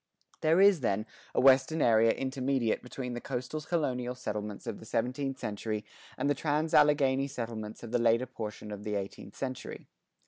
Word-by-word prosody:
There 160 +3 +4
is, 200 -3 +6
then, 110 -4 0 0.3
a - - +3
western 135 +4 +5
area 115 -3 +5
intermediate 130 -2 0
between 125 0 -6
the 120 - -5
coastal 130 +4 -4
colonial 125 -7 -1
settlements 105 -4 -5
of - - -4
the - - -12
seventeenth 130 +4 -1
century 105 -1 -3 0.3
and - - 0
the 145 - +4
trans 150 +2 -1
Alleghany 140 -2 +4
settlements 115 -5 -6
of 115 - -7
the 120 - +2
latter 115 +2 +3
portion 110 -4 -7
of 105 0 -6
the 105 0 -2
eighteenth 100 0 -6
century. 130 -1 -5
125 Hz, 170 wpm, -30 LUFS, 110-140 Hz, 0.3 s, is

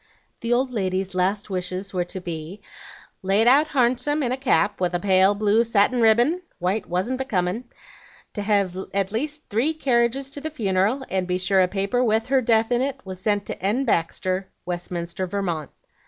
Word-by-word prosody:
The 230 - -3
old 255 +2 +2
lady's 190 -3 -2
last 195 +3 -1
wishes 185 +1 -4
were 180 -1 0
to 185 - -6
be 170 +2 -6 0.6
'laid 195 +4 +2
out 280 +5 +5
harnsome 260 +2 +1
in 245 - -1
a - - +1
cap 210 -8 +1
with 180 -1 0
a - - +1
pale 190 +1 +4
blue 210 +2 +3
satin 230 +2 +2
ribbin, 240 +10 +4 0.2
white 190 +4 -1
wasn't 190 +9 -1
becomin', 215 -3 -1 0.7
to 205 - -4
hev 200 -3 +1 0.2
at 195 -1 0
least 295 +7 -3
three 250 +10 +1
carriages 260 -1 +1
to 285 - -7
the 315 - -3
funeral, 215 -1 0
and 185 -1 0
be 180 0 0
sure 190 +1 +2
a 185 - +4
paper 200 +6 0
with 225 0 +1
her 265 -1 +3
death 225 -1 +2
in 240 0 +2
it 270 0 -2
was 185 -1 -7
sent 205 0 0
to - - -6
N. 225 +8 +1
Baxter, 185 -1 -1 0.2
Westminster, 175 0 -4
Vermont.' 175 -6 -3
205 Hz, 185 wpm, -23 LUFS, 185-245 Hz, 0.7 s, out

